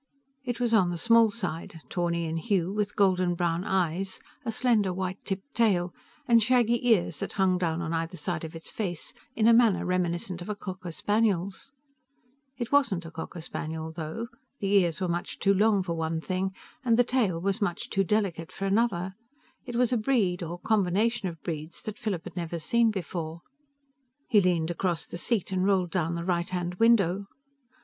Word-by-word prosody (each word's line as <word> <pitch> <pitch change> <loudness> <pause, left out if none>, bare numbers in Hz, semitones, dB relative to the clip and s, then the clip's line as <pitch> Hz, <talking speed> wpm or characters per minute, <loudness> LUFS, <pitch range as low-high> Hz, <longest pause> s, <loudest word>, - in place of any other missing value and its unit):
It 245 -2 -3
was 240 -2 +1
on 190 -5 +5
the 175 - -3
small 230 +3 +5
side, 170 -6 -5
tawny 170 -1 -1
in 160 0 -2
hue, 190 0 0
with 205 -1 -1
golden 185 -3 +3
brown 170 0 0
eyes, 190 0 0 0.2
a 230 - -2
slender 220 -5 +2
white 185 +1 -4
tipped 195 +8 -5
tail, 185 -7 +2 0.3
and 235 -2 +6
shaggy 240 0 +3
ears 175 -8 +3
that - - -3
hung 185 -2 +2
down 170 -1 -1
on 165 0 -3
either 165 +2 -2
side 170 +1 -2
of 160 0 -7
its 165 - -6
face 180 -7 -3 0.2
in 220 0 +3
a 235 - +7
manner 230 -4 +4
reminiscent 175 0 -1
of 175 - -7
a 210 - -1
cocker 185 -3 -6
spaniel's. 205 +4 0 0.9
It 240 -2 -4
wasn't 230 -12 +2
a 165 - -8
cocker 165 +1 -7
spaniel, 160 0 -5
though. 165 +8 -5 0.3
The 195 -2 -1
ears 180 -5 +3
were 185 - 0
much 175 0 -3
too 195 - +3
long, 205 0 +3
for 170 - -2
one 160 0 -1
thing, 185 +2 -2 0.3
and 230 -3 +3
the 245 - +6
tail 230 -9 +1
was 195 +4 -1
much 175 -4 -1
too 195 - +2
delicate, 190 -4 -1
for 195 - -4
another. 195 -3 +1 0.5
It 245 -2 -6
was 250 +1 +2
a - - +3
breed 215 -7 +1
or 170 +1 -4
combination 210 +2 +1
of 165 -2 -10
breeds 160 0 -5
that 215 0 -6
Philip 195 -6 -2
had - - -9
never 170 -1 -3
seen 230 +8 +3
before. 170 -4 -4 0.9
He 215 -5 +5
leaned 175 -3 +1
across 175 -2 -1
the 175 - -7
seat 210 -1 0
and 185 -1 +1
rolled 190 -3 +2
down 170 -2 0
the 170 0 -4
right 175 -1 0
hand 180 -1 -2
window. 200 -4 +4
185 Hz, 190 wpm, -28 LUFS, 170-215 Hz, 0.9 s, a